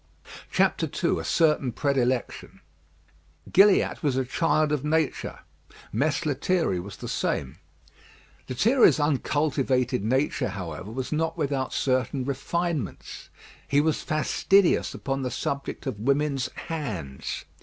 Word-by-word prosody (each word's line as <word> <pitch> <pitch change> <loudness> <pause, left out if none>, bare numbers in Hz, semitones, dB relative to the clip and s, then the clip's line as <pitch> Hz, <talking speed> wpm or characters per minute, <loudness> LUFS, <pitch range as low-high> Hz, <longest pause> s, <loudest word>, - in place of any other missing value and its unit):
II - - +1
A - - -5
CERTAIN 150 -6 +2
PREDILECTION 130 -2 -1 0.9
Gilliatt 195 +1 +5
was 140 -4 0
a 130 - +1
child 155 +2 +1
of 150 -3 0
Nature. 155 -1 -1 0.5
Mess 140 +7 0
Lethierry 155 - 0
was 95 +3 -8
the - - -7
same. 70 +5 -2 0.9
Lethierry's 185 - +4
uncultivated 135 -4 +1
nature, 130 +1 0
however, 95 -2 -6
was 125 +3 -5
not 160 +2 -1
without 140 -4 -1
certain 130 0 0
refinements. 145 - -3 0.4
He 140 - +3
was 155 0 +1
fastidious 175 +4 +2
upon 135 0 -3
the 130 - -2
subject 140 +3 -4
of 130 -7 -4
women's 135 +1 0
hands. 100 - -5
140 Hz, 110 wpm, -26 LUFS, 125-155 Hz, 0.9 s, Gilliatt